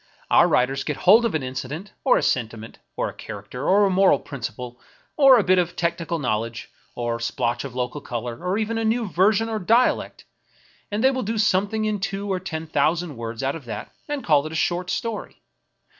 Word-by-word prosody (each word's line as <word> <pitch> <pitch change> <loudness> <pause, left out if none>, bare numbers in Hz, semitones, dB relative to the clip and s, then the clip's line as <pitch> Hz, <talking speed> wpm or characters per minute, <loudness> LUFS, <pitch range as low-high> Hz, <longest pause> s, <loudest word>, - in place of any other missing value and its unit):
Our - - +6
writers 135 +2 +1
get 150 - -3
hold 220 +6 +6
of 225 - 0
an 155 - -1
incident, 135 +9 -6
or 260 - +4
a - - -1
sentiment, 115 -2 -2 0.2
or - - -1
a - - -7
character, 105 +6 -6
or 200 +2 +5
a - - +2
moral 190 -5 +5
principle, 125 -2 -7 0.3
or 270 -3 +7
a 220 - +3
bit 185 0 +4
of 175 0 -1
technical 170 0 -1
knowledge, 115 -4 -3 0.2
or 120 -1 -2
a - - -12
splotch 120 0 -1
of 135 -3 -8
local 125 +3 -3
color, 120 +4 -5
or 180 +2 0
even 225 +1 -1
of - - -1
a - - -1
new 225 0 +1
version 200 +5 +2
of 215 -5 -4
dialect, 235 +3 +2 0.6
and 210 +2 -2
they 265 - +5
will 260 -1 -2
do 225 +1 -2
something 210 +1 +1
in 210 -1 -1
two 195 +1 -3
to 185 -1 -3
ten 160 -3 -4
thousand 160 +1 0
words 115 +1 -5
out 135 +3 0
of 155 -6 -9
that 110 -3 -6 0.2
and 290 -3 -3
call 150 -6 +3
it - - -8
a - - -6
short 175 +3 0
story. 230 -1 -4
170 Hz, 215 wpm, -23 LUFS, 125-210 Hz, 0.6 s, or